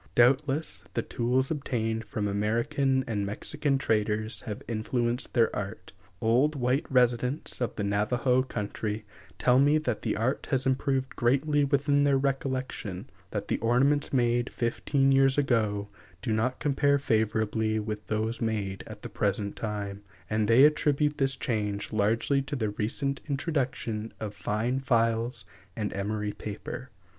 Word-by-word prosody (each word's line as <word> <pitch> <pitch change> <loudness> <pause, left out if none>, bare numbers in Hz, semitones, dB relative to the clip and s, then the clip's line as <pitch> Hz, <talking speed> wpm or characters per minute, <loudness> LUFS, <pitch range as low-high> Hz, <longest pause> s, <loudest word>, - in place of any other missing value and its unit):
Doubtless 135 +5 +3
the - - 0
tools 130 +4 0
obtained 115 -6 -2
from 105 0 -2
American 120 +7 +1
and 105 -3 -2
Mexican 135 +7 -1
traders 110 -2 0
have 105 -2 -5
influenced 120 +2 -1
their 115 -2 +3
art. 100 +2 -6 0.3
Old 125 +7 +3
white 130 +3 0
residents 125 +3 +1
of 120 - -1
the 100 - -2
Navajo 120 +6 +2
country 105 -3 -4 0.3
tell 125 +1 +4
me 145 +2 +5
that 125 -8 -2
the - - -1
art 120 +5 -1
has 130 -2 +1
improved 135 0 0
greatly 140 +4 +2
within 145 0 +2
their 140 -1 +4
recollection; 130 -6 -3 0.2
that 105 -1 -4
the - - 0
ornaments 135 +6 +2
made 120 -1 +1
fifteen 135 +3 +1
years 135 0 +4
ago 110 -7 +1 0.4
do 110 - 0
not 120 +4 0
compare 140 0 +2
favorably 110 -3 0
with 105 0 -5
those 110 +2 -1
made 105 -4 -2
at 110 -1 -10
the - - -4
present 100 0 -1
time; 100 -2 -4 0.3
and 110 -1 0
they 115 +4 +6
attribute 150 0 +2
this 135 -1 +2
change 105 -3 -2
largely 115 +6 +2
to 135 +2 -4
the 110 -5 -1
recent 135 +7 -1
introduction 130 -7 -2
of 105 -2 -4
fine 110 +5 -1
files 115 -3 +1 0.3
and 105 -2 -3
emery 105 +1 -2
paper. 110 +4 -7
120 Hz, 145 wpm, -28 LUFS, 110-135 Hz, 0.4 s, they